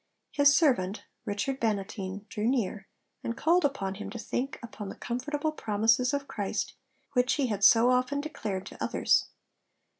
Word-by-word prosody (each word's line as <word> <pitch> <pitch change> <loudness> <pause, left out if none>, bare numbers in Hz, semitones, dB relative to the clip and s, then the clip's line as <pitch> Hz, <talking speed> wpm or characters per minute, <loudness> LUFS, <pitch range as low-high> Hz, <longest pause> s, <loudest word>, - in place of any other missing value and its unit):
His 285 -1 +5
servant, 225 - +2 0.2
Richard 235 +7 -2
Bannatyne, 200 -2 -2
drew 215 +1 -2
near, 215 -5 -1 0.4
and 230 0 -3
called 345 +2 +3
upon 240 -10 0
him 205 - -7
to - - -6
think 260 +3 -3
upon 215 -3 -7
the - - -7
comfortable 290 +6 -2
promises 225 -1 +2
of 280 -1 -2
Christ 205 0 -3 0.4
which 250 -1 +3
he 285 - +1
had 205 -2 -2
so 230 +4 +7
often 255 +3 +1
declared 210 -10 -4
to - - -7
others. - - +2
235 Hz, 155 wpm, -29 LUFS, 205-275 Hz, 0.4 s, so